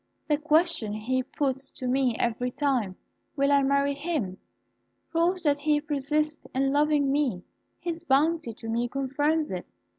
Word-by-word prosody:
"The 295 -1 +2
question 310 -7 +2
he 245 +5 -1
puts 270 +1 -1
to 255 - -5
me 255 -2 +2
every 240 +1 0
time, 250 -8 0 0.4
'Will 280 0 +2
I 280 0 +5
marry 280 +1 +2
him?' 280 - -3 0.7
proves 345 +2 +1
that 290 -2 +2
he 300 0 +2
persists 300 +1 -2
in 270 +1 +2
loving 290 -1 +3
me: 270 -11 0 0.4
his 335 -1 -4
bounty 310 -2 +2
to 225 +1 -10
me 235 +2 0
confirms 290 +4 0
it. 180 -1 -6
280 Hz, 150 wpm, -27 LUFS, 255-300 Hz, 0.7 s, I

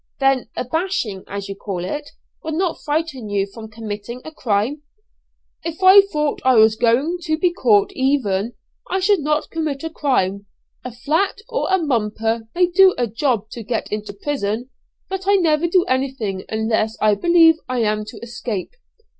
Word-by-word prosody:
"Then 270 -2 +2
a - - -2
bashing, 255 - -2
as 200 0 -5
you 200 - -4
call 190 -3 -5
it, 290 +10 -5 0.3
would 315 0 -3
not 355 0 -1
frighten 295 -7 -2
you 200 -1 +1
from 220 +2 -11
committing 220 +1 -6
a 315 - -7
crime?" 240 +2 -1 0.8
"If 335 +3 -5
I 380 +2 +10
thought 300 -7 -2
I 260 -1 +4
was 220 -1 +6
going 260 +10 +1
to 315 -2 -1
be 345 +1 +1
caught 215 - +3
even, 245 -6 0 0.4
I 380 - 0
should 390 +1 +3
not 300 +1 -1
commit 310 -4 -3
a 325 - -4
crime. 200 -10 0 0.4
A 250 - -6
'flat' 305 - 0
or - - -1
a 380 - +5
'mumper' 225 - -1
may 360 +1 +4
do 370 +2 +5
a 245 - +1
job 230 -1 -1
to 235 - -7
get 225 +1 -3
into 210 0 -4
prison, 260 - -3 0.4
but 385 0 -5
I 400 - +5
never 335 -3 +2
do 355 +1 +3
anything 255 -7 -2
unless 220 0 0
I 215 -1 +4
believe 330 +7 +5
I 250 -1 0
am 215 0 0
to 220 - -10
escape. 230 -4 -5
255 Hz, 175 wpm, -20 LUFS, 215-320 Hz, 0.8 s, I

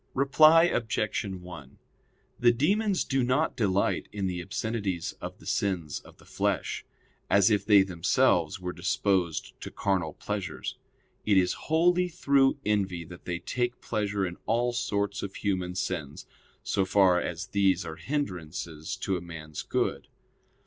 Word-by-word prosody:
Reply 155 +4 +6
Obj. 110 -9 0
1: 90 -7 -9 0.6
The 120 0 +6
demons 195 - +1
do 135 -1 0
not 130 +6 +1
delight 100 -3 0
in 100 -2 -3
the 90 -1 -2
obscenities 100 -1 -3
of - - -6
the - - -17
sins 90 -7 -1
of - - -17
the - - -19
flesh, - - -1 0.5
as 100 +2 +5
if 105 - +2
they 100 -3 +6
themselves 95 0 +2
were 90 -1 -4
disposed 95 -3 0
to - - -6
carnal 95 -6 -1
pleasures: 105 -3 -4 0.5
it 105 -2 +3
is 90 -1 +3 0.2
wholly 175 +3 +3
through 140 -6 +2
envy 95 -5 0
that 85 +2 -12
they 90 -1 -2
take 120 +7 -2
pleasure 105 -3 -1
in 90 -1 -5
all 120 +2 +1
sorts 100 -4 -1
of 100 -1 -6
human 90 -3 -2
sins, 80 -6 -4 0.4
so 95 - +1
far 95 -2 +4
as 85 0 -4
these 95 -3 +2
are 80 -1 -6
hindrances 90 - -4
to 95 -1 -2
a - - -6
man's 80 -3 -7
good. - - -1
100 Hz, 150 wpm, -28 LUFS, 90-120 Hz, 0.6 s, Reply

